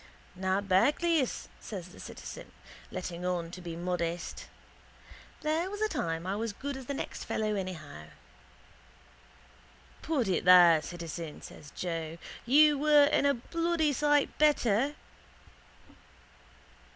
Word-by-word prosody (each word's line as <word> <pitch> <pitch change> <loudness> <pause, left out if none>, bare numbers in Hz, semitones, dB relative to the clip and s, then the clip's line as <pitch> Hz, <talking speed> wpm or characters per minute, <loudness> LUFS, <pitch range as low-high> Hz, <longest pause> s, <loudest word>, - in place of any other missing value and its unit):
—Na 190 +1 0
bacleis, 275 - +2
says 185 -4 -7
the - - -15
citizen, - - -9 0.4
letting 180 -1 -5
on 175 -2 -2
to 180 - -9
be 170 -2 -6
modest. 175 -1 -3 1.0
There 320 +4 0
was 410 +1 -6
a 435 - +2
time 165 - -3
I 190 +2 -1
was 220 0 -3
as - - -25
good 280 0 -4
as 265 -2 -9
the 280 - -3
next - - -5
fellow 215 -1 -1
anyhow. 165 - -6 2.0
—Put 285 -9 0
it 185 - 0
there, 175 -3 +8
citizen, 165 -1 -7
says 145 - -11
Joe. 165 -2 -4 0.3
You 295 +2 +6
were 295 -1 +6
and 285 - +3
a 280 - +3
bloody 330 +4 0
sight 295 0 +2
better. 280 -3 +3
200 Hz, 125 wpm, -30 LUFS, 175-290 Hz, 2.0 s, there